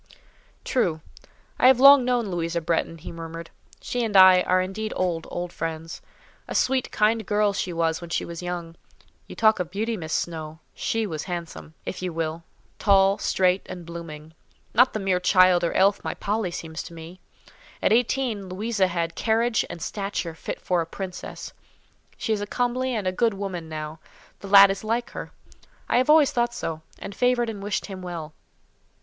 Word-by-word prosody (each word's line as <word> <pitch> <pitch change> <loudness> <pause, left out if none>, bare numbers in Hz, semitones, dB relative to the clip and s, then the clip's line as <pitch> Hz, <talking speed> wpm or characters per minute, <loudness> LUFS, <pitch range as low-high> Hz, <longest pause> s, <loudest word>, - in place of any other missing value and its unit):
"True. 170 -11 0 0.6
I - - +6
have 260 -1 +6
long 275 0 +9
known 245 -4 0
Louisa 170 -1 -1
Bretton," 165 0 -1
he 155 - -9
murmured. 165 0 -8 0.3
"She 245 -1 -2
and 210 -3 +1
I 185 -1 +8
are 185 0 +2
indeed 195 +4 -3
old, 175 -3 -1
old 175 0 -5
friends; 165 +1 -5 0.5
a - - -5
sweet, 260 -1 +1
kind 220 +1 +2
girl 210 0 +1
she 185 - -2
was 165 0 0
when 170 - -8
she - - -1
was 170 0 -7
young. 175 -2 -5 0.5
You - - -10
talk 220 -2 +4
of 180 -2 -2
beauty, 220 +5 -2
Miss 160 -3 -7
Snowe! 160 -2 -3 0.2
she 225 -1 -1
was 155 -6 -5
handsome, 170 -3 -7
if 185 - -5
you 185 -1 -2
will—tall, 170 +4 0
straight, 185 0 +2
and 180 -2 -8
blooming—not 165 +8 -2
the 215 - -2
mere 190 -2 +1
child 185 -1 +4
or 170 - +1
elf 200 +1 +3
my - - -3
Polly 210 -1 -1
seems 160 -1 -6
to 170 - -10
me: 165 +3 -10 0.6
at - - +2
eighteen, 235 -4 0
Louisa 200 +1 0
had 170 -2 -2
a - - -31
carriage 225 +3 +1
and 165 - -7
stature 195 -4 -3
fit 160 - -6
for 180 -2 0
a 165 - -4
princess. 185 +1 -7 0.6
She 220 - -1
is 210 - -2
a 205 - -4
comely 250 +2 -1
and 210 -3 -2
a 185 - +1
good 225 +2 +1
woman 185 -5 -5
now. 155 0 -6 0.4
The 200 - -9
lad 200 0 +8
is 195 - -5
like 230 +2 -2
her; - - -7 0.6
I - - +2
have 255 +3 +2
always 305 -2 +6
thought 240 0 0
so, 160 -1 -4 0.2
and 200 - -8
favoured 245 +1 +1
and 205 -2 -8
wished 205 0 -2
him 190 -2 -8
well. 170 -4 -6
185 Hz, 185 wpm, -25 LUFS, 170-220 Hz, 0.6 s, long